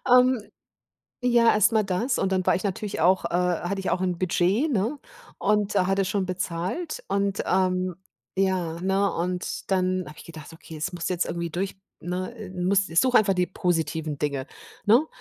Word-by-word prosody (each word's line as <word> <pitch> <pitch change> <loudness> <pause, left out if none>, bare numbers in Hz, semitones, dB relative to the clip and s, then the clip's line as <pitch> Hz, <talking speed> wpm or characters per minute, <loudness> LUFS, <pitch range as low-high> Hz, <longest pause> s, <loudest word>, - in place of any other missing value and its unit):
Ähm, 250 -1 +5 0.8
ja, 240 -2 +4
erst 215 +1 +4
mal 220 -1 +3
das 210 +7 0
und 195 - 0
dann 185 -1 +1
war - - +4
ich 185 - -3
natürlich 205 +1 -3
auch, 185 +3 +4
äh - - -1
hatte 180 +2 0
ich 190 - -2
auch 180 - 0
'n 180 -2 0
Budget, 185 - +1
ne, 235 +6 0 0.4
und 210 -1 +1
hatte 195 0 +2
schon 190 0 0
bezahlt. 185 - -3
Und, 200 0 0
ähm, 185 -1 +1 0.4
ja, 185 -4 0
ne, 195 +1 +1
und 180 +1 -3
dann 185 -1 +1
habe 150 - -11
ich - - -12
gedacht: 160 -2 -10
„Okay, 160 0 -11
das 155 +3 -3
musst 175 0 -3
jetzt 180 -1 0
irgendwie 170 0 -3
durch 190 +4 -3 0.2
ne, 185 +6 -4
äh, 215 -4 -8
musst 185 0 0
such 255 -1 +2
einfach 200 -4 +5
die 180 -1 +1
positiven 160 -5 -1
Dinge.“, 140 -2 -2 0.4
ne? 240 +9 +5
185 Hz, 180 wpm, -25 LUFS, 175-205 Hz, 0.8 s, Ähm